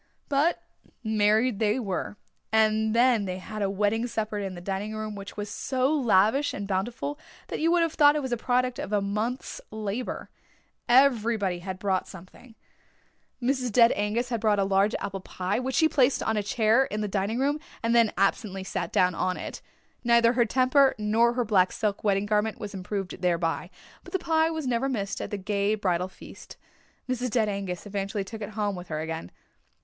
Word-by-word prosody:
But 290 +4 +1 0.4
married 220 +1 +2
they 215 +2 +2
were, 205 -2 -3 0.3
and 220 0 +2
then 235 -3 +4
they 185 -1 -3
had 215 +3 -7
a 200 - +1
wedding 210 +4 0
supper 215 -2 -3
in 195 -2 -4
the - - -7
dining 195 +4 -4
room 215 0 -4
which 200 0 -9
was 205 0 -3
so 260 +6 0
lavish 245 0 +3
and 200 0 -5
bountiful 235 +9 -2 0.3
that - - -3
you 325 - +2
would 345 -1 +4
have 330 -1 -1
thought 290 -1 +5
it 300 - 0
was 260 - -4
the - - +2
product 250 +1 0
of - - -5
a 210 - +3
month's 215 +6 -3
labour. 215 +3 -4 0.6
Everybody 230 -7 +3
had 185 +1 -6
brought 190 -1 -1
something. 190 +6 -13 0.8
Mrs. 255 -1 0
Dead 230 +2 +6
Angus 215 +4 -1
had 235 -3 -2
brought 215 -2 +3
a 200 - +2
large 195 +2 +2
apple 195 -1 -4
pie, 185 +2 -3
which 260 +1 -3
she 320 - +5
placed 275 -3 +2
on 220 - 0
a 210 - +1
chair 225 +3 +3
in 210 -3 -4
the 210 - -1
dining 200 +3 -1
room 285 +3 +1 0.2
and 230 +1 +1
then 230 -2 +5
absently 195 0 0
sat 175 -2 -4
down 180 -1 +3
on 180 +2 -1
it. - - -7 0.4
Neither 235 0 +4
her 240 -1 +3
temper 260 +4 +3
nor 220 +3 +2
her 245 -1 0
black 190 -4 +3
silk 210 -2 -2
wedding 200 -1 +2
garment 210 +1 0
was 205 -1 -6
improved 195 0 -5
thereby, 170 -1 0 0.3
but - - -13
the - - +3
pie 320 -2 +2
was 320 -3 -4
never 255 +2 0
missed 200 -6 -3
at - - -4
the 205 - -3
gay 200 +1 0
bridal 180 -3 0
feast. 190 - -13 0.5
Mrs. 250 0 -1
Dead 220 -1 +1
Angus 195 -3 -4
eventually 200 0 -3
took 220 +3 -9
it 205 - -4
home 205 -2 0
with 180 0 -8
her 155 -2 -3
again. 160 - -5
215 Hz, 195 wpm, -27 LUFS, 195-245 Hz, 0.8 s, Dead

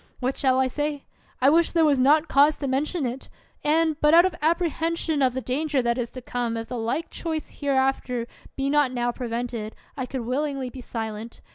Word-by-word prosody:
What 255 +1 -1
shall 260 -2 +2
I 265 - +4
say? 290 +2 -3 0.4
I 270 +2 +6
wish 335 +1 +3
there 330 -2 +4
were 295 -2 +4
not 300 +5 +4
cause 290 +2 +4
to 280 - -3
mention 285 +4 -1
it; 250 +2 -5 0.3
and, 315 0 +2
but 300 +2 +6
out 345 +2 +8
of 375 - 0
apprehension 330 -1 0
of 255 -2 +2
the 260 - -1
danger 280 +4 0
that 235 +1 0
is 235 -1 -2
to 255 - -9
come 240 -2 -2
if 225 0 -5
the 250 - -4
like 235 +9 -2
choice 320 -3 -4
here 285 -1 -2
after 265 -2 0 0.3
be 270 0 -1
not 290 -2 +3
now 245 -1 0
prevented, 235 -2 -4 0.2
I 260 -3 -4
could 260 -1 -4
willingly 265 +1 -2
be 260 - -9
silent. 225 -1 -6
270 Hz, 210 wpm, -25 LUFS, 245-300 Hz, 0.4 s, out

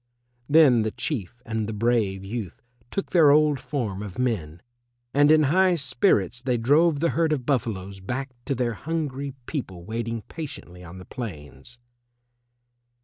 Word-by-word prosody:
Then 145 -6 +6
the 110 - 0
Chief 120 - -4
and 110 -2 -2
the 110 - -4
brave 105 -4 0
youth 105 -3 -6 0.3
took 195 - -4
their 165 -5 +6
old 150 -1 +4
form 125 -7 -3
of 105 -2 -7
men, 90 -10 -2 0.5
and 145 +1 +5
in 155 0 +6
high 180 +5 +4
spirits 125 - +1
they 125 -1 0
drove 145 +6 +3
the 170 - +3
herd 165 -1 +1
of 135 -5 -1
buffaloes 100 -8 -2
back 130 +8 -4
to 140 - -1
their 120 -1 -1
hungry 140 -1 -4
people 95 - -5
waiting 115 0 -4
patiently 90 - -8
on 85 +1 -10
the 90 - -10
plains. 90 - -8
120 Hz, 150 wpm, -25 LUFS, 100-145 Hz, 0.5 s, Then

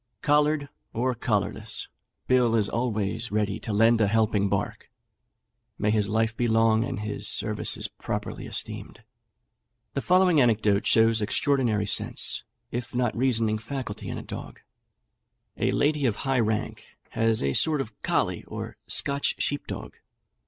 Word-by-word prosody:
Collared 150 0 +2 0.3
or 125 +3 0
collarless, 110 -4 -2 0.4
Bill 125 -3 +3
is 105 -3 +2
always 115 -1 -2
ready 105 -2 0
to 110 - -5
lend 115 +2 +4
a 105 - +4
helping 105 -1 +2
bark. - - -3 0.9
May 105 +1 +1
his 105 -2 +1
life 110 +1 +1
be 120 +1 0
long, 115 0 +3
and 105 - -4
his 105 0 -4
services - - 0
properly - - -5
esteemed!" - - -4 0.9
The 140 - -1
following 180 -3 +4
anecdote 110 -4 +2
shows 115 0 +4
extraordinary 115 -1 +1
sense, - - +1 0.3
if 120 +1 -5
not 120 -2 0
reasoning 115 -3 +2
faculty, 120 -2 -6
in - - -4
a - - -6
dog: - - -8 1.0
A - - +1
lady 145 -2 +2
of 110 - 0
high 135 +3 0
rank 110 -2 -1 0.3
has 115 -1 +1
a 70 -1 +1
sort 155 - +4
of 115 -5 -4
colley, - - 0
or - - -7
Scotch 140 0 +2
sheep 145 0 -2
dog. - - -7
115 Hz, 145 wpm, -26 LUFS, 105-130 Hz, 1.0 s, lend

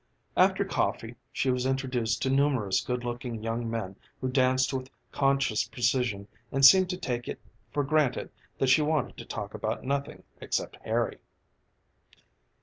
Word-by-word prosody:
After - - +4
coffee - - -1 0.2
she 130 - +1
was 125 0 0
introduced 130 -4 -1
to 130 - +1
numerous 135 -8 +2
good 125 -1 -3
looking 120 -2 -4
young 115 +1 -2
men 110 -4 -4 0.2
who 130 - -2
danced 130 0 +2
with 130 0 -3 0.2
conscious 135 -6 +1
precision 120 -5 0 0.2
and 135 0 +4
seemed 185 +5 +8
to 180 - -2
take 120 -9 -3
it - - -5 0.3
for 145 - 0
granted 145 -3 +1 0.3
that 135 - +1
she 130 +4 +6
wanted 150 -2 0
to - - -8
talk - - -6
about - - -3
nothing 140 +1 -3 0.2
except - - -2
Harry. - - -1
130 Hz, 150 wpm, -28 LUFS, 120-135 Hz, 0.3 s, seemed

